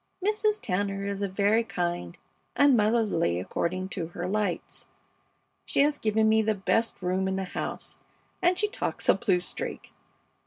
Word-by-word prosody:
Mrs. 425 0 +2
Tanner 195 - -1
is 200 0 -3
very 200 +3 +2
kind 175 - -3 0.4
and 285 -2 +6
motherly 210 - +2
according 185 - -2
to 175 -5 -4
her 175 +1 -5
lights. 200 -2 -2 0.8
She - - +1
has 290 0 +2
given 220 0 +2
me 220 0 +4
the 220 0 +1
best 225 +3 0
room 185 +1 0
in 190 - -1
the 190 - -1
house, 185 - -5 0.4
and 360 0 +3
she 420 - +1
talks 415 - -3
a - - +8
blue 195 -7 +1
streak. 180 - -6
200 Hz, 155 wpm, -27 LUFS, 185-230 Hz, 0.8 s, a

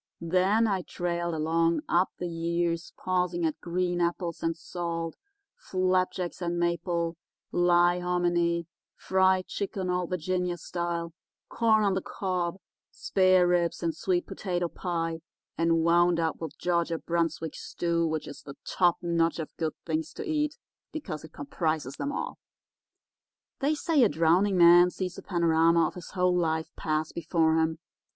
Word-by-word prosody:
Then 185 +6 +3
I 195 -4 +1
trailed 170 -1 -3
along 165 +1 +1
up 180 +2 +3
the 180 - -3
years, 170 0 -1
pausing 180 -2 0
at 155 - -2
green 175 0 -1
apples 170 0 -1
and 165 0 -1
salt, 165 -1 -4 0.4
flapjacks 185 - -1
and 175 0 -1
maple, 170 -1 -1 0.3
lye 175 0 +4
hominy, 175 -1 +1 0.3
fried 190 0 +2
chicken 190 -2 -3
Old 180 -1 -1
Virginia 180 0 -1
style, 170 -1 -3 0.4
corn 220 -2 +3
on 200 -2 +2
the 190 - -1
cob, 180 -2 -2 0.3
spareribs 180 - +2
and 165 -2 0
sweet 175 +1 0
potato 175 -3 -2
pie, 165 -2 -3 0.4
and 165 0 +2
wound 170 +1 +4
up 160 -1 -1
with 160 -3 -6
Georgia 170 -1 0
Brunswick 165 -2 -2
stew, 170 -1 -1
which 155 -1 -3
is - - -9
the 140 - -10
top 175 -2 +2
notch 170 -1 +1
of 160 -2 -6
good 160 -2 -2
things 160 -1 -2
to 435 - -6
eat, 300 -1 0 0.3
because 280 - -6
it 160 - -11
comprises 145 -1 -3
'em 285 - -2
all. - - -4 1.2
"They 290 +3 +1
say 305 -1 +2
a 230 - +6
drowning 180 +5 +3
man 175 +1 +8
sees 180 0 -5
a - - -9
panorama 165 -1 +3
of - - -3
his 180 -2 -9
whole 180 -1 +2
life 160 -2 0
pass 155 0 -1
before 160 -1 +1
him. 160 0 0
175 Hz, 145 wpm, -28 LUFS, 165-180 Hz, 1.2 s, man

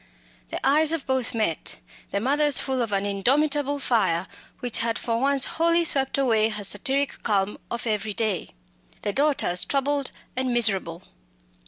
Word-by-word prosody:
The - - -4
eyes 300 +3 +4
of 330 -4 -2
both 260 -3 -1
met 215 -8 -2 0.3
the 200 - -1
mother's 285 +4 +3
full 265 -2 0
of 230 -3 -2
an 200 0 0
indomitable 285 +8 +1
fire 190 -10 0 0.3
which 245 -3 -1
had 230 0 +1
for 230 -1 -2
once 275 0 +2
wholly 335 +1 +2
swept 270 -4 0
away 225 -5 +2
her 210 -1 -4
satiric 270 +8 -1
calm 200 -2 0
of 235 - -4
every 210 -2 -2
day; 215 - -2 0.5
the 205 - -1
daughter's 275 -11 +2
troubled 280 0 -1 0.3
and 255 0 -1
miserable. 195 -7 +1
245 Hz, 155 wpm, -24 LUFS, 210-280 Hz, 0.5 s, eyes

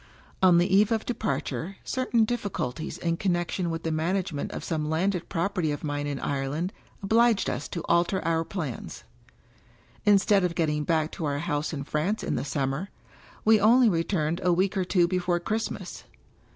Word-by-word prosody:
On 180 -2 +6
the 180 +2 +3
eve 210 +3 +4
of 220 -1 0
departure, 210 -5 -3
certain 250 -3 +1
difficul 205 - -2
ties 155 +4 -6
in 170 -1 -1
connection 175 -1 -1
with 165 0 -4
the 160 - -1
management 165 -1 -1
of - - -6
some 155 -3 -2
landed 180 +3 0
property 170 -2 0
of 145 - -5
mine 145 -1 -2
in 140 -2 -3
Ireland 145 +7 -2 0.3
obliged 225 +1 +3
us 125 - -4
to 170 - -5
alter 170 +3 +2
our 165 0 +1
plans. 160 - -6 1.0
Instead 205 -1 +4
of 175 -2 0
getting 150 -2 0
back 160 0 +1
to 165 - -4
our 140 -1 -1
house 150 -1 -2
in 140 -4 -4
France 155 +9 -1
in - - -1
the 125 - -1
Sum 135 -1 -1
mer, 170 +9 -4 0.6
we 220 0 +6
only 235 +3 +6
returned 165 -2 0
a 180 - +3
week 185 +3 +1
or 190 -2 0
two 175 -1 +3
before 180 -1 0
Christmas. 220 +5 -4
175 Hz, 180 wpm, -27 LUFS, 155-195 Hz, 1.0 s, On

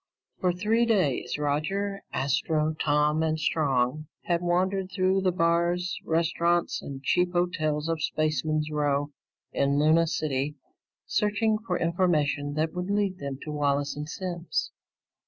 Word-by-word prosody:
For 180 -2 +2
three 215 +6 +1
days, 185 - +1
Roger, 190 +8 -1
Astro, 155 +3 0
Tom, 150 +1 +2
and 160 0 0
Strong 145 -1 0 0.2
had 170 -1 0
wandered 185 +2 0
through 190 0 +2
the 185 -1 +2
bars, 170 +1 +1
restaurants, 170 +1 +1
and 135 -1 -8
cheap 180 +5 +2
hotels 155 -4 0
of 165 -1 -1
Spaceman's 155 0 0
Row 145 -1 0 0.4
in 140 0 +1
Luna 160 +3 +4
City 145 -2 -1 0.5
searching 215 +1 +1
for - - 0
information 155 -4 +1
that 160 +1 0
would 180 +1 -4
lead 200 -2 0
them 140 -1 -4
to 155 - -5
Wallace 145 -1 0
and 150 +1 -6
Simms. 175 -1 -3
160 Hz, 135 wpm, -27 LUFS, 150-180 Hz, 0.5 s, Luna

